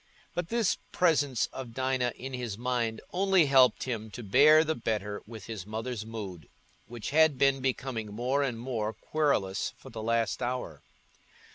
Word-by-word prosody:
But 175 -1 -3
this 230 -4 +1
presence 145 -8 +2
of 125 -4 -7
Dinah 130 -1 0
in 135 +2 -7
his 120 -5 -4
mind 120 -2 -1
only 190 -2 +4
helped 135 -2 +5
him 110 -4 -4
to 120 - -7
bear 150 +9 +6
the 160 0 0
better 105 -5 -3
with 110 -2 -9
his 110 -5 -6
mother's 110 0 -4
mood, 100 -8 -7 0.4
which 120 0 -6
had 155 -2 +5
been 135 0 +3
becoming 125 -4 -2
more 125 +6 0
and 125 -5 -1
more 115 -3 -2
querulous 125 -12 -1
for - - -13
the 110 -1 -6
last 115 +1 0
hour. 120 - -3
125 Hz, 160 wpm, -29 LUFS, 110-135 Hz, 0.4 s, bear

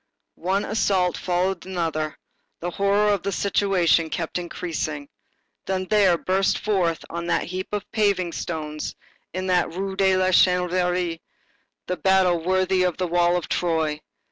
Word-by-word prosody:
One 190 +4 0
assault 195 -4 +1
followed 180 +1 -1
another. 165 -4 -2 0.4
The 175 +1 -3
horror 200 +3 +2
of 200 - -1
the 200 - -2
situation 185 -4 +2
kept 165 +2 -3
increasing. 155 -4 -4 0.6
Then 185 0 -1
there 195 -3 +4
burst 190 +3 +1
forth 185 -6 0
on 170 0 -4
that - - +1
heap 185 +2 -5
of 205 -1 -3
paving 200 -5 +1
stones, 155 -3 -4 0.4
in 185 +1 -3
that 180 -1 +2
Rue 195 +1 -3
de 190 -1 +3
la 185 0 +2
Chanvrerie, 180 -2 +2 0.7
a 180 - -1
battle 185 -3 +3
worthy 185 +1 +2
of 180 -1 0
a 185 - +1
wall 175 0 +2
of 175 - -4
Troy. 160 -3 0
180 Hz, 145 wpm, -24 LUFS, 170-190 Hz, 0.7 s, there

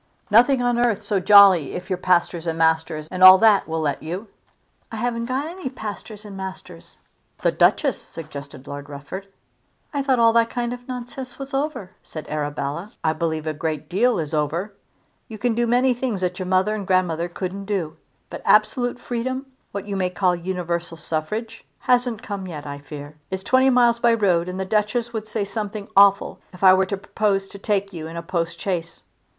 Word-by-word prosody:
"Nothing 245 +4 +5
on 240 0 +2
earth 230 -5 +1
so 205 -3 0
jolly 195 -6 +7
if 180 +1 -6
your 185 - -1
pastors 175 -2 +1
and 165 0 -1
masters 160 -1 +1
and 185 - -4
all 185 0 +11
that 215 -1 +4
will 160 0 -2
let 145 -2 -1
you." 180 +7 -6 0.6
"I - - -5
haven't 235 +1 -2
got 260 +3 -1
any 335 -3 -5
pastors 215 -3 -8
and 205 -2 -9
masters." 190 - -9 0.5
"The - - +3
Duchess!" - - +2
suggested 145 -4 -9
Lord 145 0 -8
Rufford. 145 +8 -8 0.7
"I 285 - 0
thought 270 -2 +2
all 230 -1 +5
that 230 0 +3
kind 240 0 -2
of 245 0 -10
nonsense 250 0 -7
was 275 0 -8
over," 270 -9 -2
said 155 - -9
Arabella. 150 +5 -3
"I 160 - +2
believe 160 -1 -2
a 155 - -1
great 155 -1 -4
deal 230 +6 +2
is 155 -2 -4
over. 160 +7 -1 0.5
You 220 - -8
can 240 +2 0
do 235 +1 0
many 250 +2 +3
things 240 -5 -3
that 180 0 -2
your 185 - -4
mother 185 +3 +2
and 205 -3 -4
grandmother 175 -3 +1
couldn't 190 +2 -5
do; 185 -7 -2 0.4
but - - -6
absolute 245 -2 +2
freedom, 255 +3 -3 0.3
what 200 0 -5
you 200 -1 -4
may 185 -1 0
call 180 0 +1
universal 170 -1 -3
suffrage, 165 +10 -4
hasn't 245 -2 +1
come 200 -4 -5
yet, 150 -4 -7
I 140 0 -6
fear. 145 +1 -10
It's 190 0 -4
twenty 260 +6 +4
miles 240 -2 +4
by 235 -1 +4
road, 180 -5 +1
and 185 +1 -5
the 190 - -2
Duchess 220 +4 0
would 220 -1 -4
say 215 -1 -2
something 210 0 -5
awful 200 0 +5
if 180 - -11
I 185 -1 +9
were 190 0 +3
to 200 - -2
propose 195 -1 -1
to 200 - -10
take 200 -1 -1
you 160 -2 -6
in 165 +1 -8
a 170 - -5
postchaise." 170 0 -3
195 Hz, 195 wpm, -22 LUFS, 170-230 Hz, 0.7 s, all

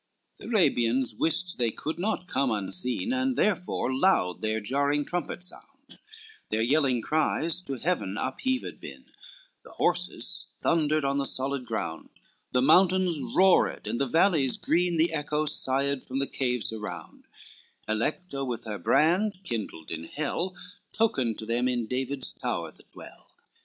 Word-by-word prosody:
XXI - - -46
The - - -11
Arabians 130 - +2
wist 165 +6 +1
they 120 -2 +2
could 155 +8 -5
not 195 -1 -1
come 140 -6 0
unseen, 125 - -1
And 260 0 0
therefore 180 - 0
loud 130 - +2
their 110 0 0
jarring 140 +6 +1
trumpets 175 0 -2
sound, 275 +5 -16 0.5
Their 110 +1 +1
yelling 130 -2 +2
cries 160 +2 +1
to 140 -7 -4
heaven 125 - -1
upheaved 255 - -2
been, - - -10 0.6
The - - -14
horses - - 0
thundered 155 -2 +1
on 140 0 +1
the 140 - -1
solid 135 -1 -2
ground, 80 -7 -4 0.4
The 125 0 +2
mountains 180 +1 +4
roared, 190 0 +3
and 120 - -2
the 140 - +1
valley 160 -2 +3
green, 175 +1 +1
The 160 +1 +2
echoes 150 0 -1
sighed 135 +1 +1
from 130 - -5
the 140 - +1
caves 125 -4 -2
around, 105 -1 -8 0.6
Alecto 135 - -2
with 120 -3 -4
her 105 -2 -5
brand, 180 - +3
kindled 110 - -5
in 80 0 -4
hell, 165 - -3 0.4
Tokened 130 - +1
to 110 - -6
them 120 +2 +1
in 120 -2 0
David's 130 +3 -2
tower - - -3
that - - -22
dwell. - - -12
140 Hz, 150 wpm, -27 LUFS, 125-175 Hz, 0.6 s, mountains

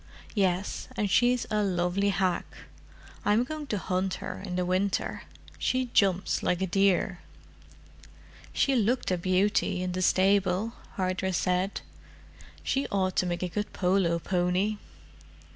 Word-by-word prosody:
"Yes—and 200 +3 -1
she's 245 +4 +3
a 210 0 +2
lovely 185 +1 +1
hack. 185 -3 0 0.8
I'm 210 +3 +3
going 305 +2 -6
to 210 - -1
hunt 185 0 -1
her - - -6
in 185 -3 -4
the 180 0 0
winter: 185 +2 -1 0.3
she 255 -1 0
jumps 190 -2 +2
like 180 - 0
a 190 - +1
deer." 190 -1 +2 1.3
"She 275 - +2
looked 235 -1 +1
a 180 - +2
beauty, 185 0 +1
in 180 - -2
the 185 +1 -2
stable," 195 +3 +2 0.2
Hardress 185 -1 -1
said. 180 +2 0 0.8
"She 270 +1 0
ought 190 -2 0
to 185 - +2
make 175 +1 -2
a - - 0
good 210 +4 -4
polo 180 -2 +2
pony." 180 +4 0
190 Hz, 135 wpm, -28 LUFS, 180-210 Hz, 1.3 s, she's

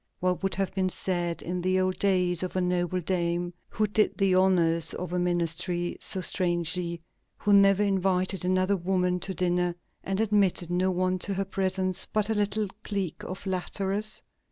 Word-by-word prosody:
What 180 0 0
would 195 -1 0
have 195 -1 -1
been 190 -1 0
said 175 -2 -3
in 180 +1 -3
the 185 +1 +1
old 185 0 0
days 180 -3 +2
of 185 0 -4
a - - +2
noble 180 0 0
dame 175 0 -1 0.2
who 215 - 0
did 210 +1 +1
the 195 -2 +3
honors 170 -3 +3
of 180 -1 -5
a 180 - +1
ministry 175 0 0
so 190 - +1
strangely, 175 -1 0 0.4
who 205 - +1
never 195 0 +6
invited 190 -1 +1
another 185 +2 +2
woman 180 0 0
to 190 +1 -3
dinner, 180 -1 +1 0.3
and 195 +1 -2
admitted 200 -5 +2
no 180 +1 +2
one 185 0 0
to 195 +2 -1
her 195 +1 -1
presence 190 -1 -1
but 215 0 +1
a - - +3
little 210 0 0 0.2
clique 195 -5 -2
of 185 - -5
flatterers? 195 +2 -2
185 Hz, 175 wpm, -27 LUFS, 175-195 Hz, 0.4 s, never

